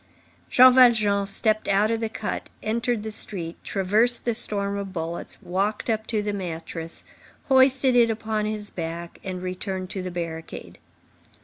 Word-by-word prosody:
Jean 255 0 +8
Valjean 215 -6 +5
stepped 215 +2 +1
out 205 +3 +3
of 225 - 0
the 225 -1 -2
cut, 215 -1 -4
entered 230 0 -1
the 220 - -4
street, 175 -6 -3
traversed 215 +5 +1
the 235 - +1
storm 200 -3 -3
of 200 -1 -4
bullets, 170 -1 -5
walked 200 +5 -1
up 220 0 -2
to 215 -3 0
the 205 0 -2
mattress, 165 -3 -6 0.4
hoisted 265 -1 +5
it 235 -1 +5
upon 220 -1 -1
his 210 -1 -4
back, 170 0 -6
and 185 -1 -5
returned 185 0 -4
to 190 - -4
the 185 - -4
barricade. 165 -2 -6
205 Hz, 155 wpm, -25 LUFS, 185-225 Hz, 0.4 s, Jean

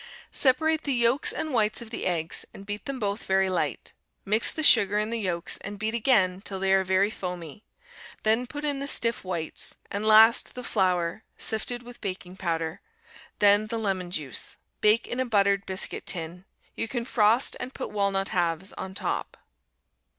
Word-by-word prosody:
Separate 315 +4 +2
the 280 -4 -1
yolks 240 +4 +3
and 310 -3 -3
whites 215 -2 +2
of 230 -2 -9
the 230 - -2
eggs 165 -3 0
and 195 - -10
beat 205 +1 -5
them 275 -1 -4
both 205 -1 -2
very 190 0 +2
light. 185 - -2 0.3
Mix 215 +3 +3
the 315 - -4
sugar 205 -7 +6
in 215 +1 -1
the 235 - -1
yolks 175 -5 -1
and 205 +1 -7
beat 215 +2 -2
again 215 -6 +2
till 195 -2 -5
they 190 0 +2
are 190 0 +4
very 190 +2 +2
foamy; 180 -1 -6 0.6
then 225 +3 +2
put 290 +3 -6
in 285 -2 0
the 280 - -4
stiff 230 -5 +1
whites, 170 -4 -4 0.2
and 200 +1 -2
last 220 +1 +6
the 250 - -6
flour, 180 -3 0
sifted 240 +2 -2
with 245 0 -12
baking 185 -2 -5
powder; 165 -1 -3 0.6
then 205 +1 +5
the 230 - -3
lemon 190 -5 -2
juice. 150 -8 -3 0.2
Bake 215 +2 +4
in 245 - -4
a 260 - +1
buttered 200 -3 +2
biscuit 190 0 -4
tin. 175 +1 -5 0.3
You - - -2
can 235 0 -3
frost 230 +2 +3
and 255 - -5
put - - -6
walnut 200 -1 0
halves 175 +1 -1
on 190 0 -7
top. - - -3
205 Hz, 180 wpm, -27 LUFS, 185-235 Hz, 0.6 s, sugar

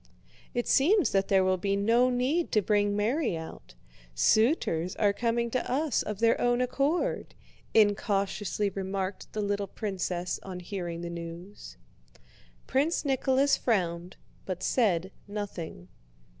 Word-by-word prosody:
"It 240 - -1
seems 335 +5 +4
that 195 0 +1
there 190 -1 +4
will 185 0 +1
be 200 +1 0
no 230 +5 +3
need 260 +7 0
to 215 - +4
bring 205 0 +2
Mary 225 - 0
out, 160 - -10 0.4
suitors 185 - +2
are 205 -2 +2
coming 235 +1 -1
to 255 0 -2
us 285 0 +1
of 210 - -4
their 230 +2 +2
own 245 0 +2
accord," 275 +6 -1 0.4
incautiously 205 -1 +1
remarked 190 0 -4
the 215 - -2
little 200 0 -1
princess 185 -3 -3
on 185 -2 -7
hearing 175 -2 -5
the 170 0 -5
news. 170 - -9 0.9
Prince 295 +5 0
Nicholas 270 0 +3
frowned, 180 -5 -1 0.3
but 185 -2 -4
said 190 -7 +1 0.2
nothing. 195 - -6
205 Hz, 130 wpm, -28 LUFS, 185-245 Hz, 0.9 s, seems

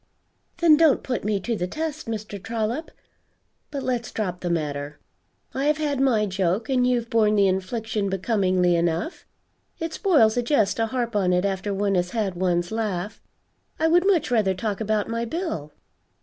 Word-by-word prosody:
"Then 335 -3 +6
don't 315 -4 +4
put 250 -2 -2
me 205 -1 0
to 235 +4 -2
the 180 -3 -2
test, 310 - -4
Mr. 215 -3 -5
Trollop. 230 - -3 0.8
But 280 -2 -5
let's 245 -2 -2
drop 180 -5 -3
the 175 - -3
matter. 145 -3 -2 0.6
I 270 +2 -1
have 300 +1 +3
had 290 -3 -1
my 235 -6 +3
joke 190 +3 -1
and 250 -2 +3
you've 240 -2 +1
borne 215 -2 +3
the 200 -1 +4
infliction 200 +2 -1
becomingly 185 -3 +1
enough. 170 - -1 0.5
It 325 0 -4
spoils 265 - +3
a - - +3
jest 235 -5 +1
to 225 0 +1
harp 235 -1 -2
on 185 -3 +2
it 180 +2 +2
after 195 +1 -2
one 200 0 0
has 180 -1 +1
had 205 -4 0
one's 175 0 0
laugh. 210 -2 -3 0.6
I 320 - +3
would 350 +3 +4
much 350 -10 +2
rather 210 -5 +2
talk 205 +2 -3
about 215 -1 0
my 230 0 -2
bill." 235 - -4
215 Hz, 175 wpm, -24 LUFS, 185-250 Hz, 0.8 s, Then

